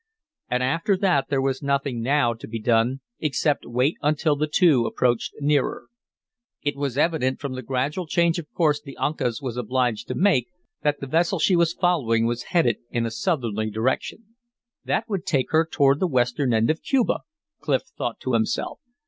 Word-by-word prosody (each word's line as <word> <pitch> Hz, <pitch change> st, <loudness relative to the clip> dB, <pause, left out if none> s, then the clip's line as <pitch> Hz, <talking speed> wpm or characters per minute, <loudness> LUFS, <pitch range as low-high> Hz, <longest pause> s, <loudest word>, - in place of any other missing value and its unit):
And 125 Hz, 0 st, 0 dB
after 165 Hz, +9 st, +1 dB
that 180 Hz, -9 st, +2 dB
there 135 Hz, -2 st, +1 dB
was 135 Hz, -1 st, -1 dB
nothing 140 Hz, -3 st, -1 dB
now 130 Hz, -1 st, +2 dB
to 115 Hz, -, -10 dB
be 115 Hz, 0 st, -5 dB
done 115 Hz, +4 st, +1 dB, 0.2 s
except 150 Hz, -1 st, 0 dB
wait 125 Hz, +6 st, +1 dB
until 150 Hz, 0 st, +2 dB
the 150 Hz, +2 st, -1 dB
two 150 Hz, -7 st, +4 dB
approached 120 Hz, -2 st, 0 dB
nearer. 145 Hz, -1 st, 0 dB, 0.7 s
It 145 Hz, -1 st, -1 dB
was 140 Hz, -2 st, -3 dB
evident 150 Hz, -5 st, +1 dB
from 140 Hz, -3 st, -4 dB
the 130 Hz, -, -5 dB
gradual 135 Hz, +8 st, -2 dB
change 170 Hz, +1 st, +2 dB
of 150 Hz, -, -10 dB
course 150 Hz, -3 st, +1 dB
the 140 Hz, -2 st, -11 dB
Uncas 135 Hz, -4 st, -1 dB
was 125 Hz, -2 st, -4 dB
obliged 125 Hz, -1 st, -1 dB
to -, -, -3 dB
make 180 Hz, -, +3 dB, 0.3 s
that 145 Hz, -1 st, 0 dB
the -, -, -3 dB
vessel 170 Hz, +7 st, +1 dB
she 180 Hz, +3 st, +3 dB
was 170 Hz, -1 st, +3 dB
following 130 Hz, -13 st, +1 dB
was 120 Hz, +1 st, -2 dB
headed 170 Hz, -3 st, +2 dB
in 120 Hz, -1 st, -1 dB
a 115 Hz, -, -3 dB
southerly 115 Hz, -, -1 dB
direction. 130 Hz, -, -2 dB, 0.5 s
"That 225 Hz, -, -1 dB
would 195 Hz, -5 st, -2 dB
take 145 Hz, -9 st, 0 dB
her 160 Hz, +1 st, +3 dB
toward 140 Hz, -1 st, +3 dB
the 185 Hz, -, +2 dB
western 125 Hz, -1 st, +1 dB
end 115 Hz, +4 st, +3 dB
of 160 Hz, -, -4 dB
Cuba," 265 Hz, -4 st, +1 dB, 0.4 s
Clif -, -, 0 dB
thought -, -, -3 dB
to -, -, -2 dB
himself. -, -, -1 dB
140 Hz, 180 wpm, -24 LUFS, 125-160 Hz, 0.7 s, two